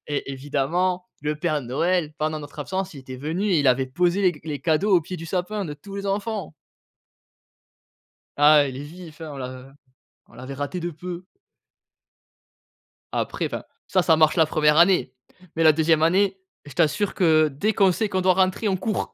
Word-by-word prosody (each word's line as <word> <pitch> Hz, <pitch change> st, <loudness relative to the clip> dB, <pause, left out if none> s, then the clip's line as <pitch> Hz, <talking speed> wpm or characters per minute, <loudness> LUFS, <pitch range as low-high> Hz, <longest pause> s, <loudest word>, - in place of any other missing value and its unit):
et 145 Hz, -1 st, -3 dB
évidemment, 160 Hz, +7 st, -1 dB, 0.2 s
le 150 Hz, 0 st, -1 dB
Père 155 Hz, -3 st, 0 dB
Noël 155 Hz, +5 st, 0 dB
pendant 155 Hz, 0 st, -1 dB
notre 145 Hz, +1 st, -12 dB
absence, 190 Hz, +4 st, -3 dB
il 140 Hz, -, -9 dB
était 130 Hz, -1 st, -9 dB
venu 160 Hz, +9 st, -3 dB
et 175 Hz, -, +3 dB
il 140 Hz, -, 0 dB
avait 130 Hz, +1 st, +3 dB
posé 175 Hz, +8 st, +1 dB
les 185 Hz, -2 st, +4 dB
c 150 Hz, -, -15 dB
les 150 Hz, -4 st, -4 dB
cadeaux 170 Hz, +7 st, +2 dB
au 175 Hz, -, +5 dB
pied 180 Hz, +3 st, -7 dB
du 165 Hz, 0 st, -8 dB
sapin 190 Hz, +4 st, -2 dB
de 150 Hz, -, -5 dB
tous 195 Hz, +7 st, -10 dB
les 200 Hz, 0 st, -4 dB
enfants. 205 Hz, 0 st, -3 dB, 1.9 s
Ah, 145 Hz, 0 st, +6 dB
il 130 Hz, -, -6 dB
est 140 Hz, -, -6 dB
vif, 165 Hz, +1 st, -12 dB
hein! 155 Hz, -2 st, -6 dB
On 140 Hz, -, -8 dB
l'a 130 Hz, +1 st, -8 dB, 0.5 s
on -, -, -23 dB
l'avait 130 Hz, +2 st, -8 dB
raté 145 Hz, +6 st, -4 dB
de 175 Hz, -, -3 dB
peu. 175 Hz, +3 st, -7 dB, 1.9 s
Après, -, -, -2 dB
enfin, -, -, -6 dB, 0.2 s
ça, 185 Hz, -2 st, +2 dB
ça 160 Hz, -2 st, +4 dB
marche 155 Hz, -1 st, +4 dB
la 160 Hz, -, +6 dB
1re 150 Hz, 0 st, +2 dB
année, 170 Hz, -6 st, +4 dB, 0.4 s
mais 165 Hz, -, +1 dB
la 155 Hz, -1 st, +7 dB
2e 160 Hz, 0 st, +2 dB
année, 190 Hz, +4 st, +2 dB, 0.3 s
je 145 Hz, -, -11 dB
t'assure 175 Hz, +6 st, +1 dB
que 155 Hz, -4 st, +3 dB
dès 200 Hz, +11 st, -1 dB
qu'on 195 Hz, -1 st, +4 dB
sait 215 Hz, +4 st, -1 dB
qu'on 190 Hz, -2 st, -1 dB
doit 185 Hz, 0 st, +4 dB
rentrer, 190 Hz, +3 st, +1 dB
on 190 Hz, -, 0 dB
court, 210 Hz, +2 st, -3 dB
165 Hz, 195 wpm, -23 LUFS, 145-185 Hz, 1.9 s, la